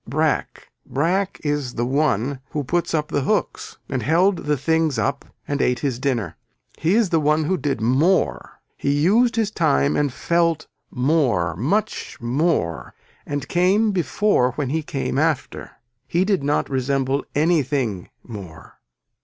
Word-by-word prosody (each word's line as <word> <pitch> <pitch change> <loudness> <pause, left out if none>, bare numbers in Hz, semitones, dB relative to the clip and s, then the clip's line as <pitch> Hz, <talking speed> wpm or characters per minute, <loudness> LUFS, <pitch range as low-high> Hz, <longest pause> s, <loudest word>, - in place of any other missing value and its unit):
Brack, - - -1
Brack 185 +7 -1
is 145 -4 -2
the 120 - 0
one 135 -1 0
who 150 - -3
put 170 +6 -1
up 150 -1 -1
the 145 - 0
hooks 205 +7 -2
and 130 -3 -2
held 175 - +2
the 150 -1 +2
things 160 -1 +1
up 140 +5 -1 0.2
and 145 -1 -1
ate 125 - +2
his 130 -4 -1
dinner. 130 -6 -1 0.4
He 165 +6 +2
is 220 -5 +2
the 165 - +3
one 155 +1 +2
who 185 +5 +1
did 140 -7 -2
more. 140 +11 +1 0.2
He 140 - 0
used 205 - +3
his 220 -2 0
time 70 - +2
and 145 -2 +1
felt 170 +2 0 0.2
more 125 - +1
much 195 - -2
more 120 - -1 0.3
and 145 -1 -3
came 195 +5 +2
before 175 - +1
when 140 -1 -3
he 160 +2 0
came 140 -2 -2
after. 155 -3 -1 0.4
He 175 +3 +1
did 195 -4 +1
not 145 +1 +1
resemble 135 +1 0
anything 140 - 0
more. 95 -9 -11
145 Hz, 150 wpm, -22 LUFS, 130-170 Hz, 0.4 s, the